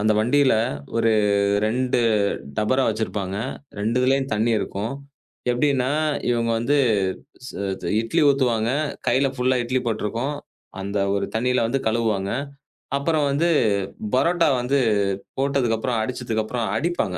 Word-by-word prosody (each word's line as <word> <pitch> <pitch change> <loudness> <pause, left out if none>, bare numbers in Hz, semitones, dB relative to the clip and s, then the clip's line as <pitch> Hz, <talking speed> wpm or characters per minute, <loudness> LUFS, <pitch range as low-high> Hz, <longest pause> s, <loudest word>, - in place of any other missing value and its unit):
அந்த 110 +1 +3
வண்டில 130 +3 +3 0.4
ஒரு 115 -1 +3 0.5
2 125 +2 0 0.6
டபரா 130 +5 +2
வச்சிருப்பாங்க. 105 -3 -2 0.4
2துலயும் 125 +5 +1
தண்ணி 115 +2 +1
இருக்கும். 105 +6 -3 0.6
எப்டின்னா 130 0 +1 0.4
இவங்க 115 -1 +1
வந்து 135 +6 +1 1.2
இட்லி 115 +9 0
ஊத்துவாங்க. 120 -5 +2 0.4
கைல 135 +1 +3
ஃபுல்லா 130 +1 +2
இட்லி 130 +2 0
பட்டுருக்கும். 115 +6 -2 0.4
அந்த 100 +1 -3 0.2
ஒரு 100 - 0
தண்ணியில 125 +1 +1
வந்து 125 +4 0
கழுவுவாங்க. 110 -4 0 0.7
அப்புறம் 150 +1 +1
வந்து 155 +5 +1 0.7
பரோட்டா 170 +6 +3
வந்து 125 +3 +1 0.6
போட்டதுக்கு 135 -4 +1
அப்புறம் 115 0 -1
அடிச்சதுக்கு 115 -1 -2
அப்புறம், 115 +1 -3
அடிப்பாங்க. 125 - -1
120 Hz, 110 wpm, -23 LUFS, 110-135 Hz, 1.2 s, அந்த